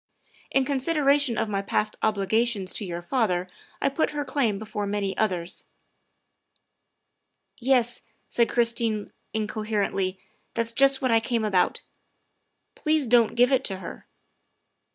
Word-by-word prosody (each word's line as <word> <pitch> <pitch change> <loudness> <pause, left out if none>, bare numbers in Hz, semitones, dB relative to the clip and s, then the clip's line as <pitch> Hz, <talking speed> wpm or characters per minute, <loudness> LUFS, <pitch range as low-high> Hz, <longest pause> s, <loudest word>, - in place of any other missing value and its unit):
In 270 0 +2
con 280 0 0
sideration 285 -3 +2
of 225 - 0
my 200 -2 -1
past 210 +2 -1
obligations 215 -1 +1
to 210 - -2
your 175 -1 -5
father 185 -5 0 0.3
I - - +2
put 275 +4 0
her 290 -1 -3
claim 260 -7 0
before 210 -1 -4
many 200 -1 -2
others." 180 -5 -1 0.6
" - - -51 1.2
Yes," 245 -1 +2 0.3
said 235 -1 +1
Christine 230 -3 +1 0.2
incoherently, 210 -3 -1 0.2
" - - -44
that's 230 0 -1
just 270 +3 +4
what 255 - +2
I 225 - +5
came 230 -1 -1
about. 190 -4 +1 0.9
Please 310 -2 +1
don 235 -1 +5
't - - -13
give 245 +2 +4
it 265 - +3
to 195 - -2
her. 185 - -9
225 Hz, 145 wpm, -26 LUFS, 200-255 Hz, 1.2 s, I